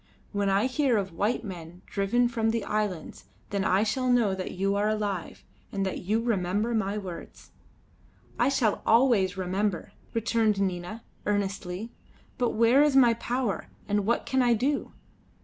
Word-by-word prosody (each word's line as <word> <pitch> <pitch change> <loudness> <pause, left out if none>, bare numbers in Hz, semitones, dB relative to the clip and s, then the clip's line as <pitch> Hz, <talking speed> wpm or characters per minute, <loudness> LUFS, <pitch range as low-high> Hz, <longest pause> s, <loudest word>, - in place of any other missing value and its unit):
When 200 -1 0
I 195 +3 +3
hear 260 -2 +2
of 195 -3 -2
white 210 +8 0
men 175 -3 -9
driven 235 +5 +1
from 225 -2 0
the 230 0 -1
islands, 210 -6 -3 0.3
then 200 -1 0
I 190 +2 +3
shall 255 +4 0
know 235 -5 +3
that 190 -1 -4
you 195 +2 0
are 205 +1 +1
alive, 205 -5 -3 0.3
and 195 -1 -1
that 190 - -3
you 210 +5 0
remember 210 0 0
my 210 -2 0
words." 185 -4 -8 0.9
"I - - +4
shall 240 -6 +1
always 225 -6 +3
remember," 185 0 -1 0.2
returned 225 -2 +1
Nina, 190 +3 -3 0.2
earnestly; 200 +1 -2 0.5
"but 245 -2 +1
where 230 +5 +5
is 295 -2 +3
my 245 -3 +6
power, 235 -4 -2 0.2
and 205 -1 0
what 235 - +1
can 265 0 +1
I 240 -1 +4
do?" 275 +6 -1
210 Hz, 160 wpm, -27 LUFS, 195-235 Hz, 0.9 s, my